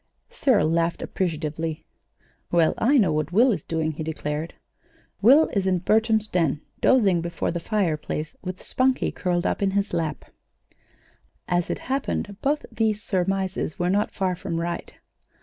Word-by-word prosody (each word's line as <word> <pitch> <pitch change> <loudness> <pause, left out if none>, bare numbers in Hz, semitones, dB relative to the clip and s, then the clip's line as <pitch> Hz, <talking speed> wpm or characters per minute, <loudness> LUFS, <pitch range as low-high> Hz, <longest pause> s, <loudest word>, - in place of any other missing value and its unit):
Cyril 245 - +3
laughed 165 +1 0
appreciatively. 160 -2 -3 0.7
"Well, 170 -2 +4
I 275 +5 +4
know 190 -10 +3
what 155 +2 -1
Will 240 +7 +5
is 180 -9 -2
doing," 160 -1 -1
he 155 - -7
declared. 155 0 -4 0.7
"Will 275 +9 +6
is 195 -2 -1
in 185 -1 +3
Bertram's 220 +3 +2
den 165 -7 0 0.2
dozing 200 -10 +4
before 170 0 -2
the 170 - -3
fireplace 165 -5 -2
with 185 0 -6
Spunkie 260 0 +1
curled 175 -1 -1
up - - 0
in 200 - +2
his 200 -1 -1
lap." 160 -5 -2 1.2
As 175 -1 0
it - - -1
happened, 260 -6 -2
both 295 +2 0
these 220 -1 0
surmises 190 -3 -1
were 175 0 +1
not 205 +2 +1
far 185 -2 -1
from 175 -2 -4
right. 170 0 -4
180 Hz, 150 wpm, -24 LUFS, 165-210 Hz, 1.2 s, Will